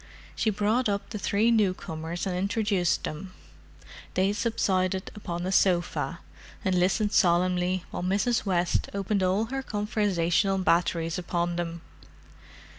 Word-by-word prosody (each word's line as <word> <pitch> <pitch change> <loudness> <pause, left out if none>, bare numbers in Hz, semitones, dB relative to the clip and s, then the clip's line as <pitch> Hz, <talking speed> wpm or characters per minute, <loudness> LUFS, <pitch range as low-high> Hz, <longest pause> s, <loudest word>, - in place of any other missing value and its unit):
She 220 - +1
brought 215 +4 +1
up 200 0 -3
the 215 - -4
three 215 +4 +2
newcomers 175 -6 -1
and 185 -2 -2
introduced 200 -2 0
them. 185 +5 -6 0.8
They 190 +2 +2
subsided 190 -4 0
upon 175 -4 -5
a 185 - -1
sofa, 180 -2 +1 0.4
and 190 - +2
listened 190 +4 +2
solemnly 180 0 +2
while - - -4
Mrs. 200 +6 +1
West 180 -3 0
opened 200 0 0
all 190 +4 +2
her 270 - -1
conversational 200 -5 0
batteries 170 -2 +1
upon 175 -1 -1
them. 170 -1 -4
185 Hz, 125 wpm, -27 LUFS, 175-205 Hz, 0.8 s, three